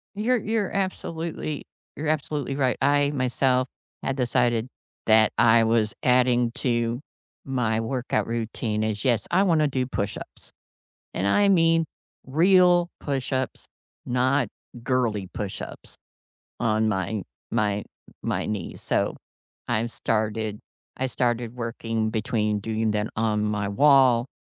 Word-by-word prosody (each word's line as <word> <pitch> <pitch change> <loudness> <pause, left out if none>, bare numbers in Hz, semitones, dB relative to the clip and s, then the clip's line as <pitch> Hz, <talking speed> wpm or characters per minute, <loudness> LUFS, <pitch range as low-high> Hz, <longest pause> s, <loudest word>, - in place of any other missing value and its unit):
You're 240 +5 +1
you're 215 -2 -1
absolutely 165 -5 -3 0.3
you're 150 +1 -3
absolutely 145 -3 -1
right. 130 -3 +1
I 145 +1 +3
myself 130 -1 +1 0.3
had 135 - -2
decided 120 -2 +1 0.4
that 110 -1 +5
I 115 -1 +6
was 110 -1 +1
adding 125 -1 +3
to 120 -1 0 0.4
my 120 -4 0
workout 115 -2 -1
routine 115 -1 -2
is, 110 -1 -2
"Yes, 120 -5 +2
I 185 +3 +4
wanna 160 -5 +3
do 130 -2 -1
push-ups, 100 -5 -5 0.6
and 95 - -1
I 200 - +4
mean 165 -3 +4 0.4
real 175 +4 +4
push-ups, 130 -2 -2 0.4
not 125 0 +2 0.4
girly 115 -7 0
push-ups 100 -2 -6 0.6
on 110 -1 +2
my 100 0 -1 0.3
my 105 -3 0 0.4
my - - -1
knees." 105 -5 -5
So - - 0 0.5
I've 115 0 0
started 110 -1 -1 0.4
I 130 - 0
started 120 -2 -1
working 115 -2 -2
between 105 -1 0
doing 110 +1 -1
them 105 0 -1
on 110 -1 +1
my 105 -1 -1
wall 130 0 +5
120 Hz, 120 wpm, -25 LUFS, 110-140 Hz, 0.6 s, I